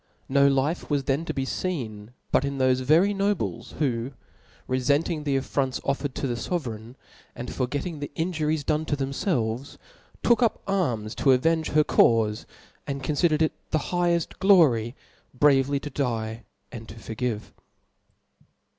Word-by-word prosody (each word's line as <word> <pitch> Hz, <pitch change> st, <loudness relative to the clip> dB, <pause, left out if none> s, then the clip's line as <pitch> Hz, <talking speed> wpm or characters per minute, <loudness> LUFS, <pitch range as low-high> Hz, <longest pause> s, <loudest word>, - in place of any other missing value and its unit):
No 140 Hz, +1 st, +4 dB
life 140 Hz, +5 st, 0 dB
was 145 Hz, -2 st, +1 dB
then 140 Hz, +5 st, 0 dB
to -, -, -2 dB
be 135 Hz, -, -1 dB
feen 115 Hz, -, -4 dB, 0.2 s
but -, -, +3 dB
in 140 Hz, 0 st, -2 dB
thofe 130 Hz, -1 st, +2 dB
very 165 Hz, +10 st, +4 dB
nobles, 200 Hz, -1 st, -2 dB
who 130 Hz, -3 st, -1 dB, 0.5 s
refenting 145 Hz, +5 st, 0 dB
the 140 Hz, -2 st, +1 dB
affronts 135 Hz, 0 st, -1 dB
offered 140 Hz, 0 st, -2 dB
to -, -, -2 dB
the 120 Hz, -3 st, -1 dB
fovereign, 120 Hz, -5 st, -4 dB, 0.4 s
and 120 Hz, -, -6 dB
forgetting 145 Hz, +5 st, -3 dB
the 145 Hz, -, -5 dB
inju 160 Hz, -2 st, -1 dB
ries 155 Hz, -1 st, 0 dB
done 155 Hz, +2 st, 0 dB
to 145 Hz, -, -1 dB
themfclvcs, 135 Hz, -, -2 dB, 0.5 s
took 235 Hz, +1 st, +4 dB
up. 230 Hz, -3 st, +1 dB
arms 125 Hz, -, -1 dB
to 135 Hz, -, +3 dB
avenge 160 Hz, +5 st, +2 dB
her 150 Hz, 0 st, +4 dB
caufe, 110 Hz, -6 st, +3 dB, 0.4 s
and 140 Hz, -1 st, -4 dB
confidered 155 Hz, +2 st, +2 dB
it 155 Hz, -, +2 dB
as -, -, -41 dB
the -, -, +1 dB
higheft 175 Hz, +1 st, -1 dB
glory 140 Hz, -, +4 dB, 0.4 s
bravely 140 Hz, 0 st, +3 dB
^o 145 Hz, -1 st, -8 dB
die 115 Hz, -4 st, -2 dB, 0.3 s
and 115 Hz, -2 st, -9 dB
to -, -, -9 dB
forgive. 110 Hz, -1 st, -4 dB
140 Hz, 155 wpm, -26 LUFS, 125-160 Hz, 0.5 s, No